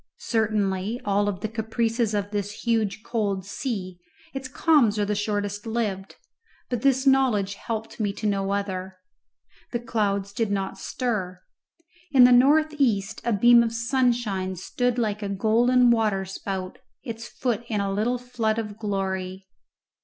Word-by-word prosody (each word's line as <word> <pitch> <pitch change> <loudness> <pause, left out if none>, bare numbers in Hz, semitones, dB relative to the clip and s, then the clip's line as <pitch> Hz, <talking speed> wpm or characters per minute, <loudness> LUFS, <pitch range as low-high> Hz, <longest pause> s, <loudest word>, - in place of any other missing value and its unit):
Certainly, 210 -2 0
of - - -22
all 205 +1 +2
the 195 +3 -4
caprices 225 0 -1
of 205 0 -2
this 205 0 -4
huge 220 -3 0
cold 200 -5 -2
sea, 195 -5 -4 0.3
its 270 -1 -5
calms 260 -6 +3
are 205 - +1
the 210 - -1
shortest 205 0 -2
lived, 210 -4 -2 0.6
but 245 -2 -1
this 265 0 +2
knowledge 250 -8 +3
helped 220 +2 -5
me 205 -2 0
to 215 - -7
no 195 -2 0
other. 190 -2 -3 0.7
The 240 - -1
clouds 200 -4 -1
did 225 -1 -1
not 195 -1 -2
stir. 200 -8 -3 0.7
In 260 -3 +6
the 250 - +8
north 300 +5 +5
east 225 -5 +1
a 235 - 0
beam 235 +3 +6
of 230 -1 0
sunshine 235 -6 0
stood 245 +7 -1
like 215 -3 -1
a 200 - -3
golden 235 +5 +3
waterspout, 195 -3 -2 0.2
its 230 -2 -6
foot 240 -3 -2
in 215 -3 -1
a 200 -1 -1
little 225 +5 0
flood 235 -3 -2
of 215 -2 -5
glory. 190 -2 -3
215 Hz, 150 wpm, -25 LUFS, 200-235 Hz, 0.7 s, the